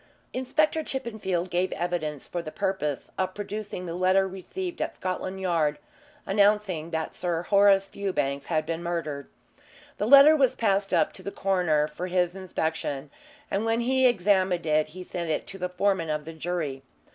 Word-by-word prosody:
Inspector 310 +5 +1
Chippenfield 210 -9 -3
gave 180 +1 +1
evidence 155 -4 -3
for 175 - -3
the 160 - -7
purpose 190 -8 -2
of 185 0 -1
producing 205 -2 -5
the 165 - -4
letter 185 +2 +3
received 345 - -6
at - - -2
Scotland 185 +1 -3
Yard 165 -5 +1 0.5
announcing 200 -5 +2
that 160 -1 -3
Sir 170 -1 -2
Horace 200 0 +5
Fewbanks 180 -9 -2
had 155 -2 0
been 165 +1 -3
murdered. 165 -5 -3 0.7
The 210 - 0
letter 280 +4 +9
was 270 -5 +3
passed 200 -3 +1
up - - +2
to - - -8
the 200 - -5
coroner 175 -7 +1
for 155 +4 -5
his 180 -1 +1
inspection, 160 -6 -3 0.4
and 195 - 0
when 225 +1 +1
he 260 +2 +2
had - - +8
examined 185 -5 +2
it 155 0 +2
he 185 +2 -9
sent 175 -2 -4
it 155 - -1
to 195 - -8
the 180 0 -2
foreman 185 -2 0
of 150 -1 -2
the 165 - -7
jury. 160 -4 -3
185 Hz, 170 wpm, -27 LUFS, 165-200 Hz, 0.7 s, letter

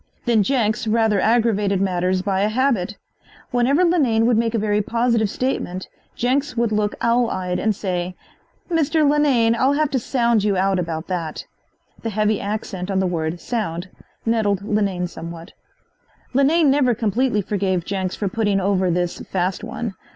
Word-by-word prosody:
Then 235 -3 +3
Jenks 225 0 0
rather 220 -2 +2
aggravated 210 -3 +2
matters 185 -1 0
by 195 -1 0
a 205 - +2
habit. 225 -5 0 0.5
Whenever 260 +7 +3
Linane 260 -11 +3
would 240 0 +3
make 230 +1 +1
a - - +2
very 210 -1 +1
positive 230 0 +1
statement 190 -7 -3 0.3
Jenks 265 +2 0
would 235 -1 +1
look 210 -1 0
owl 235 0 +2
eyed 180 -1 -2
and 220 -2 +1
say: 180 -2 -3 0.5
"Mr. 320 -2 +2
Linane, 280 -6 +3
I'll 260 +4 +2
have 300 0 +1
to 265 - +1
sound 235 -3 +1
you 205 -2 +1
out 190 0 +2
about 165 -1 -3
that." 170 -4 -4 0.6
The 225 - -3
heavy 215 0 0
accent 200 -2 -4
on 195 - 0
the 190 - +1
word 170 -1 -2
"sound" 185 -7 -3 0.4
nettled 210 -4 +1
Linane 200 -4 0
somewhat. 170 0 -8 0.8
Linane 285 +3 +4
never 265 -4 +3
completely 220 0 0
forgave 190 -3 -1
Jenks 190 -2 -2
for 205 - -2
putting 205 0 0
over 190 -1 +1
this 175 0 -1
"fast 185 0 -2
one." 230 -4 -4
210 Hz, 160 wpm, -21 LUFS, 185-240 Hz, 0.8 s, Linane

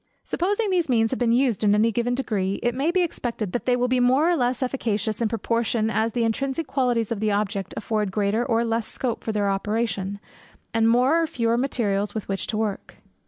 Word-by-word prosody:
Supposing 405 +4 0
these 350 -5 +1
means 225 -3 +2
to - - 0
have - - -3
been 240 -2 +2
used 240 -4 +2
in 205 0 +4
any 220 +2 +3
given 240 +2 0
degree, 200 -7 -1
it 240 - +1
may 275 +6 0
be 365 +1 +2
expected, 235 - -3
that 245 - -3
they 250 - +4
will 245 0 +1
be 255 0 +1
more 260 +6 +4
or - - +3
less 250 -2 0
efficacious, 220 -4 -1
in 230 - +2
proportion 230 0 0
as 220 0 0
the 240 - 0
intrinsic 270 +7 -1
qualities 245 -6 0
of 225 - -1
the 215 0 +1
object 200 -2 -1
afford 210 -2 -1
greater 210 +3 +1
or 235 -2 +1
less 230 -1 -1
scope 245 -4 -3
for 220 - -2
their 205 -2 0
operation, 200 -1 -2 0.5
and 225 0 +3
more 255 +8 +4
or 325 - 0
fewer 235 -7 0
materials 215 -6 -1
with 215 - -4
which 195 -1 -3
to 215 - -2
work. 215 -2 -3
230 Hz, 220 wpm, -24 LUFS, 215-250 Hz, 0.5 s, in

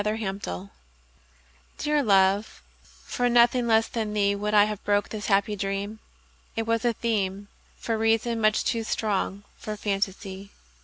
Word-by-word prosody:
The 210 +1 0
Dream 190 - -5 1.1
DEAR 300 0 +1
love, 200 -2 +2 0.4
for 245 0 0
nothing 240 0 +4
less 225 0 +4
than 215 -2 -3
theeWould 205 +1 +1
I 205 - +8
have 210 -1 -3
broke 205 0 +1
this 210 -2 -5
happy 200 +1 +2
dream; 200 +2 -3 0.6
It 225 - -1
was 230 0 0
a 240 -2 +1
themeFor 205 +1 -3
reason, 225 +1 +1
much 215 0 +3
too 230 -2 -1
strong 205 -2 -2
for 215 -1 -6
fantasy. 195 -1 -3
210 Hz, 140 wpm, -26 LUFS, 200-225 Hz, 1.1 s, I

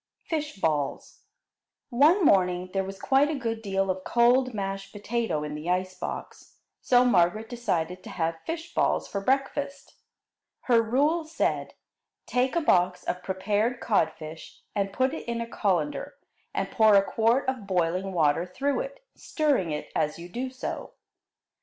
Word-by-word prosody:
Fish 305 -2 -3
balls 150 -5 -2 0.7
One 310 +9 +5
morning 180 -3 +3
there 195 -1 +1
was 195 0 -7
quite 275 +2 +3
a 315 - -1
good 230 -4 -3
deal 195 -2 0
of 185 0 -5
cold 245 +3 +3
mashed 195 -2 -4
potato 205 -6 -2
in 150 0 -5
the 150 +3 -5
ice 185 +1 0
box, 185 - -7 0.2
so 250 0 +4
Margaret 215 0 +3
decided 185 -7 -2
to - - -9
have 165 -1 -2
fish 330 +1 -5
balls - - +1
for 200 - -3
breakfast. 275 +3 -1 0.7
Her 235 -3 +4
rule 285 +9 +1
said: 320 +1 -1 0.5
Take 255 +4 0
a 340 - +2
box 180 - +2
of 180 - -3
prepared 205 +6 -1
codfish 160 -6 -2
and 200 -1 0
put 260 +6 +1
it 320 - -6
in 235 0 -2
a 235 - -2
colander 180 -9 -1 0.4
and - - -2
pour 220 -2 +5
a 195 - +6
quart 230 +6 +1
of 255 -6 -2
boiling 185 +1 0
water 165 0 +2
through 275 +10 -1
it, - - -7
stirring 285 - 0
it 150 -1 -4
as 150 - 0
you 170 +1 -9
do 250 +7 -3
so. 255 0 -6
210 Hz, 160 wpm, -27 LUFS, 180-260 Hz, 0.7 s, a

